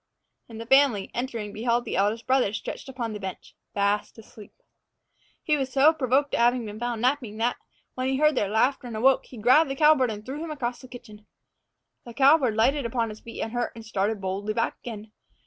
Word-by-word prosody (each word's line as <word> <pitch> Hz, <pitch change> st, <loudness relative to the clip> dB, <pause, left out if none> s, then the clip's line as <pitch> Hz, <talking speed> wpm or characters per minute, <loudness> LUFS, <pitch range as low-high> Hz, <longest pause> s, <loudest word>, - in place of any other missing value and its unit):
And 225 Hz, -1 st, -9 dB
the 230 Hz, -, -6 dB
family, 265 Hz, -5 st, +3 dB
entering, 235 Hz, -4 st, -4 dB
beheld 235 Hz, +2 st, 0 dB
the -, -, -4 dB
eldest 210 Hz, +4 st, 0 dB
brother 255 Hz, -6 st, +2 dB
stretched 245 Hz, -, -6 dB
upon 240 Hz, -4 st, -4 dB
the 210 Hz, -, -6 dB
bench 190 Hz, -2 st, -8 dB, 0.2 s
fast 205 Hz, +2 st, 0 dB
asleep. 215 Hz, -1 st, -14 dB, 0.9 s
He 305 Hz, -, +2 dB
was 270 Hz, -2 st, -2 dB
so 285 Hz, +4 st, +5 dB
provoked 275 Hz, -1 st, 0 dB
at -, -, +1 dB
having 240 Hz, 0 st, +2 dB
been 210 Hz, 0 st, -8 dB
found 240 Hz, -1 st, -3 dB
napping 250 Hz, -5 st, 0 dB
that, 235 Hz, +2 st, 0 dB, 0.4 s
when 255 Hz, 0 st, -3 dB
he 265 Hz, 0 st, 0 dB
heard 305 Hz, +1 st, +4 dB
their 205 Hz, -7 st, 0 dB
laughter 250 Hz, +5 st, +1 dB
and 225 Hz, -2 st, -6 dB
awoke, 265 Hz, +4 st, +3 dB
he 250 Hz, -, -12 dB
grabbed 260 Hz, +8 st, +4 dB
the 270 Hz, -, -3 dB
cowbird 300 Hz, -4 st, +4 dB
and 210 Hz, -1 st, -7 dB
threw 285 Hz, +5 st, -5 dB
him 330 Hz, -, -6 dB
across 250 Hz, -5 st, -4 dB
the 255 Hz, -, -12 dB
kitchen. 215 Hz, -4 st, -13 dB, 0.8 s
The 235 Hz, -1 st, -11 dB
cowbird 270 Hz, -4 st, +4 dB
lighted 270 Hz, +6 st, +2 dB
upon 230 Hz, -1 st, -1 dB
his 215 Hz, 0 st, -9 dB
feet 230 Hz, -, -8 dB
unhurt, 240 Hz, +2 st, -3 dB
and 225 Hz, -1 st, -10 dB
started 210 Hz, 0 st, -1 dB
boldly 195 Hz, +3 st, -3 dB
back 230 Hz, -, -1 dB
again. 220 Hz, -2 st, -9 dB
240 Hz, 205 wpm, -25 LUFS, 215-265 Hz, 0.9 s, so